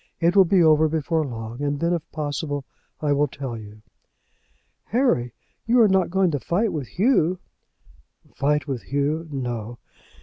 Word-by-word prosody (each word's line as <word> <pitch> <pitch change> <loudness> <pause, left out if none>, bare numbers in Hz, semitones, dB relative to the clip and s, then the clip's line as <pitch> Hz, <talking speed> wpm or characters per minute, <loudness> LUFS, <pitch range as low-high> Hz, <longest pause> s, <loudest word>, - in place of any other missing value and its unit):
It 170 +2 +2
will 195 -1 +7
be 180 0 +4
over 155 0 +5
before 160 +1 0
long, 115 -1 -6
and 145 0 -1
then, 170 +2 +1
if 170 - -1
possible, 145 -2 -3 0.4
I 150 -2 +2
will 145 +1 +2
tell 130 -3 -6
you." 105 -1 -11 1.0
"Harry, 225 - +1 0.4
you 240 +2 +4
are 225 - +7
not 190 -2 +2
going 190 -1 +2
to 145 - -1
fight 190 - 0
with 145 -6 -4
Hugh?" 185 - +2 1.0
"Fight 145 0 0
with 130 -4 -3
Hugh! 145 +4 -1
no. 120 -4 -4
150 Hz, 160 wpm, -23 LUFS, 135-175 Hz, 1.0 s, will